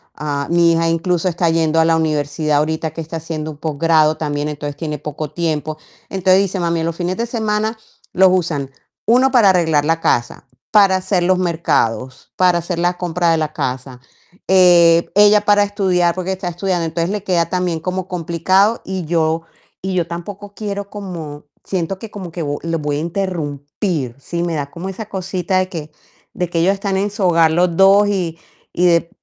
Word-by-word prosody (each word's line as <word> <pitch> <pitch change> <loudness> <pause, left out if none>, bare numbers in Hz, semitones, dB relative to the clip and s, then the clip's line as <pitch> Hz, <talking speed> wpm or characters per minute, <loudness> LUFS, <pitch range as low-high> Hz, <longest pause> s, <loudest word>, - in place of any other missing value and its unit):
Ah, 145 -2 -3
mi 170 -1 +4
hija 165 0 +1
incluso 170 +1 0
está 170 -1 0
yendo 165 -1 +2
a 160 - +4
la 165 0 +3
universidad 150 -1 0
ahorita 160 +1 -1
que 165 - -9
está 165 +1 -6
haciendo 155 -1 -5
un 150 - -12
posgrado 155 0 +2
también, 145 -1 -2
entonces 145 -1 -5
tiene 150 -3 -4
poco 150 0 -6
tiempo. 155 -2 -2 0.3
Entonces 190 0 +3
dice: 195 -1 -2
"Mami, 170 -1 0
los 165 0 -2
fines 180 +1 -2
de 235 - -1
semana 220 -1 -1 0.4
los 190 +1 +5
usan, 160 -7 -1 0.4
1 255 +4 +4
para 235 -7 +5
arreglar 160 -5 +2
la 165 +1 +1
casa, 120 -5 0 0.3
para 200 -3 +5
hacer 185 -1 0
los 185 +1 +2
mercados, 160 -8 -1
para 180 -1 +3
hacer 170 0 -4
la 175 +1 0
compra 175 -1 0
de 165 - +3
la 155 -1 -2
casa". 130 -3 -4 0.5
Eh, 175 -3 +5
ella 205 0 +6
para 205 0 +5
estudiar, 185 -4 +1
porque 185 +1 -2
está 185 -1 -4
estudiando. 175 0 -2
Entonces 165 +3 -2
le 210 -2 -3
queda 175 -4 +1
también 180 -2 -1
como 185 +2 -3
complicado 185 +5 +1
y 185 -3 -4
yo 160 0 0 0.4
y 190 0 -3
yo 175 -3 +1
tampoco 200 +4 -8
quiero 200 -1 -5
como 170 -8 -7 0.2
siento 185 0 -2
que 220 0 -9
como 195 -3 -7
vo 170 - -8
que 155 -1 -4
los 165 -1 -1
voy 145 -1 -1
a - - -2
interrumpir. 155 - -3
Sí, 170 +4 -4
me 170 -1 -2
da 140 -1 -3
como 180 +3 -6
esa 210 +3 -6
cosita 185 -1 -1
de 185 0 -1
que 155 -4 -7 0.4
de 180 -2 -2
que 170 - -1
ellos 180 +4 +3
están 195 -1 -2
en 200 +2 0
su 205 -1 -4
hogar 165 -3 +4
los 175 +1 +1
2 195 +2 +6
y 175 -5 -2 0.4
y 180 - +1
de 170 -1 +2
170 Hz, 195 wpm, -18 LUFS, 160-190 Hz, 0.5 s, ella